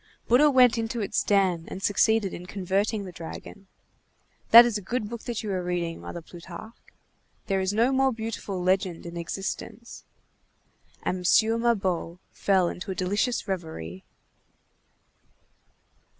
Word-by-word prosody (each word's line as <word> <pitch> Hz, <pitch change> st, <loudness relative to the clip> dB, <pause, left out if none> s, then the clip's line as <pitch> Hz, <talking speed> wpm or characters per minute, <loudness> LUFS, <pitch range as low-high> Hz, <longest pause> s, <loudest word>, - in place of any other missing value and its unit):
Bouddha 270 Hz, +6 st, +6 dB
went 250 Hz, -4 st, +5 dB
into 225 Hz, +1 st, -3 dB
its 205 Hz, -2 st, 0 dB
den 185 Hz, -5 st, +2 dB
and 190 Hz, -, -7 dB
succeeded 205 Hz, 0 st, +2 dB
in 180 Hz, +1 st, -8 dB
converting 200 Hz, +2 st, -1 dB
the 185 Hz, -, -8 dB
dragon. 175 Hz, +4 st, -9 dB, 0.8 s
That 235 Hz, +1 st, +11 dB
is 240 Hz, -3 st, -1 dB
a 205 Hz, -, -2 dB
good 225 Hz, +3 st, -3 dB
book 235 Hz, -1 st, -6 dB
that 235 Hz, -3 st, -3 dB
you 210 Hz, -, -3 dB
are 185 Hz, -1 st, -1 dB
reading, 175 Hz, -2 st, -3 dB
Mother 170 Hz, -, -7 dB
Plutarque. 175 Hz, +7 st, -12 dB, 0.5 s
There 195 Hz, -2 st, 0 dB
is 190 Hz, 0 st, 0 dB
no 230 Hz, +5 st, +2 dB
more 265 Hz, 0 st, +3 dB
beautiful 220 Hz, -4 st, -5 dB
legend 185 Hz, -2 st, 0 dB
in 170 Hz, 0 st, -7 dB
existence." 195 Hz, +6 st, -6 dB, 1.0 s
And 185 Hz, -, -1 dB
M. 220 Hz, +5 st, +3 dB
Mabeuf 190 Hz, -7 st, 0 dB
fell 190 Hz, -3 st, +2 dB
into 175 Hz, +3 st, -6 dB
a 190 Hz, -, -2 dB
delicious 205 Hz, +6 st, -1 dB
reverie. 160 Hz, -, -5 dB
195 Hz, 140 wpm, -26 LUFS, 180-225 Hz, 1.0 s, That